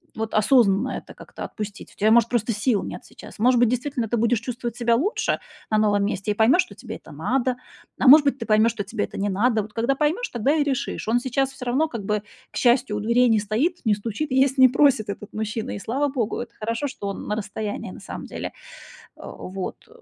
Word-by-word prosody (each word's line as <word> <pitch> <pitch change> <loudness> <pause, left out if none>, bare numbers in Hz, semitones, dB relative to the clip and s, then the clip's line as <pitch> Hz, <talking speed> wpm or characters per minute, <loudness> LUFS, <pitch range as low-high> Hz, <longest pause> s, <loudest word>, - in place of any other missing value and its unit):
вот 220 0 -4
осознанно 215 0 +4
это - - -11
как-то - - -10
отпустить. 210 -1 -7
У - - -28
тебя, 215 - +4
может, 235 0 +5
просто 235 -1 0
сил 210 0 +1
нет - - -7
сейчас. - - -13
Может 245 +3 +4
быть, 240 -2 +4
действительно 250 0 -2
ты 235 +2 -1
будешь 235 0 +2
чувствовать 240 -1 -5
себя 235 -1 +2
лучше 365 - 0 0.3
на 215 - +2
новом 205 -2 +2
месте 205 0 -2
и - - +1
поймешь, 240 - +4
что 360 - -14
тебе - - -8
это - - -13
надо. 255 -1 0 0.4
А - - +2
может 295 +3 +9
быть, 280 -1 +1
ты 230 - -4
поймешь, 220 +2 +4
что 220 -3 -4
тебе 205 +2 -3
это - - -6
не 205 +1 0
надо. 220 +3 +2
Вот 210 +1 -10
когда 235 +4 +1
поймешь, 315 - 0
тогда 255 +6 +1
и 300 - +2
решишь. 275 -6 -3
Он 235 +2 +3
сейчас 265 +2 -1
всё 255 - -9
равно 270 +6 +1
как 230 -8 -6
бы, 210 0 -1 0.3
к - - -7
счастью, 245 -3 +3
у 210 - -2
дверей 235 +3 +3
не 220 - +4
стоит, 230 - -1
не 215 - +4
стучит 230 +8 -4
и - - 0
есть 270 +1 +3
не 260 -1 +8
просит 255 -5 +3
этот 200 +1 -7
мужчина, 220 +1 -3
и - - -6
слава 265 +9 -1
богу. 250 -6 -2
Это 235 -1 -7
хорошо, 230 +6 -2
что 205 -6 -6
он 200 - -5
на 210 - -1
расстоянии 210 0 -5
на - - -10
самом - - -8
деле. - - -6 0.6
Э, - - -14 0.2
вот. 190 - -6
235 Hz, 235 wpm, -23 LUFS, 215-260 Hz, 0.6 s, может